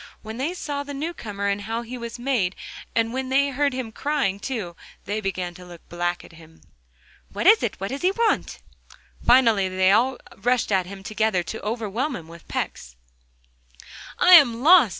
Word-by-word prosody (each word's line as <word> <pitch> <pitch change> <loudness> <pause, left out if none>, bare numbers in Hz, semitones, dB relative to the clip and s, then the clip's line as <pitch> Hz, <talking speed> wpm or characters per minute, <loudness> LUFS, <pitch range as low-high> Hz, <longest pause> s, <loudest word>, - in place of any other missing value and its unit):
When 220 +1 -7
they 300 +8 -2
saw 290 -5 -4
the 285 0 -7
new 315 +5 -3
comer 200 -8 -5
and 200 0 0
how 225 +3 -3
he 240 +2 -7
was 235 -1 -6
made, 240 -8 0 0.4
and 230 0 +1
when 260 0 -3
they 280 +2 +3
heard 280 +1 +1
him 255 -3 -5
crying 270 -7 -1
too, 205 -8 -4 0.3
they 210 +2 -2
began 185 -3 -3
to 180 - -13
look 175 -2 -13
black 175 0 -2
at - - -15
him. 160 -1 -17 0.7
'What - - -4
is 440 - +7
it? 230 - -3
what 195 +1 -3
does 275 - -5
he 365 - +3
want?' 460 +2 -1 0.6
Finally 230 -6 +4
they 185 0 +3 0.5
rushed 245 -2 0
at 185 -2 +1
him 195 0 -9
all - - -17
together, 215 -3 0
to 220 +6 -6
overwhelm 230 +5 -2
him 165 -6 -9
with 170 0 -14
pecks. - - -4 1.2
'I 360 - +4
am 250 -8 +7
lost! 325 - +7
225 Hz, 190 wpm, -24 LUFS, 190-265 Hz, 1.2 s, is